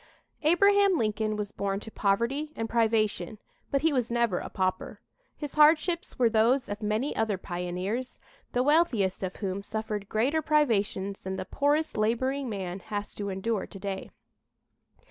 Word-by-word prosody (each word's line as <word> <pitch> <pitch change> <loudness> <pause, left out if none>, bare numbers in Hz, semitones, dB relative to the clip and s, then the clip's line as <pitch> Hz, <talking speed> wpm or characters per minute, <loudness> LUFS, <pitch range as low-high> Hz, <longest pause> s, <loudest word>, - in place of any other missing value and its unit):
Abraham 400 +4 +4
Lincoln 215 -2 0
was 210 -1 -4
born 195 0 -2
to 220 - -9
poverty 235 +11 0
and 225 - -2
privation, 220 -4 +1 0.3
but 275 - +1
he 320 -2 +3
was 250 -4 0
never 235 -5 +1
a - - -6
pauper. 185 -1 -2 0.4
His 295 -2 -6
hardships 310 +3 +3
were 245 - +4
those 235 +4 +3
of 205 +1 -5
many 215 +6 -1
other 220 -3 0
pioneers, 180 +7 -4 0.3
the 245 - +1
wealthiest 265 - +2
of 185 -1 -3
whom 195 -1 -3
suffered 210 -1 -4
greater 265 +9 +1
privations 210 -10 +1
than 190 0 -4
the 185 - -4
poorest 290 - 0
laboring 260 +5 0
man 190 -3 -4
has 205 +1 -5
to 200 -1 -4
endure 195 +2 -2
to - - -11
day. 195 0 -5
220 Hz, 155 wpm, -28 LUFS, 200-275 Hz, 0.4 s, Abraham